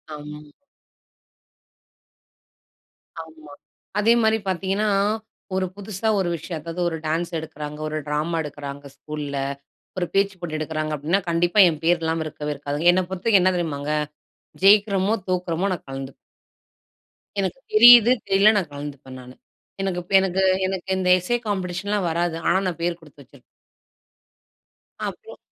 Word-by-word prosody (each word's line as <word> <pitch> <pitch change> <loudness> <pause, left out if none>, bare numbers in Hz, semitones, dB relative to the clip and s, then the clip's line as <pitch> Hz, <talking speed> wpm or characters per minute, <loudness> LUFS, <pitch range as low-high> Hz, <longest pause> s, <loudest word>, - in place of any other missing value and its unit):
ஆம். 150 0 -10 2.7
ஆமா. 155 -2 -15 0.5
அதே 225 +3 +5
மாரி 220 0 +3
பார்த்தீங்கன்னா, 195 +3 0 0.7
ஒரு 190 0 +1
புதுசா 205 +1 -5
ஒரு 185 -2 0
விஷயம் 165 0 -6
அதாவது 165 +2 -5
ஒரு 165 - -4
டான்ஸ் 165 +3 -1
எடுக்கிறாங்க, 150 -1 -7
ஒரு 155 - -3
டிராமா 155 +3 -1
எடுக்கிறாங்க 145 -1 -8
ஸ்கூல்ல. 145 -1 -6 0.6
ஒரு 175 - 0
பேச்சு 195 0 +2
போட்டி 155 -3 -4
எடுக்கிறாங்க 155 0 -3
அப்டின்னா, 165 +8 0
கண்டிப்பா 175 +4 +2
என் 155 -2 -6
பெயர் 175 0 +3
இல்லாம 160 0 -1
இருக்கவே 150 -1 -5
இருக்காது. 145 +3 -3
என்னை 185 - +2
பொறுத்தவரைக்கும் 190 +1 +2
என்ன 185 0 +3
தெரியுமாங்க? 150 -3 -2 0.7
ஜெயிக்கிறோமோ 200 0 +5
தோற்கிறோமோ 180 +1 -1
நான் 170 - -11
கலந்துக்குவேன். 135 0 -7 1.2
எனக்கு 195 +6 -2
தெரியுது, 240 +1 +9 0.2
தெரியல 200 +3 +5
நான் 180 -6 -1
கலந்துப்பேன் 140 -2 -8
நானு. 125 +1 -13 0.5
எனக்கு 185 -2 -1
இப்ப 180 - -9
எனக்கு 190 0 0 0.3
எனக்கு 190 -1 -5
இந்த 185 -1 0
எஸ்ஸே 240 +7 -1
காம்பிடேஷன்லாம் 190 0 -2
வராது. 170 0 -1
ஆனா - - +4
நான் 175 -2 -4
பேர் 170 0 -1
கொடுத்து 150 -2 -17
வச்சிருப்பேன். 130 0 -20 1.7
அப்புறம் - - -9
170 Hz, 130 wpm, -23 LUFS, 150-190 Hz, 2.7 s, தெரியுது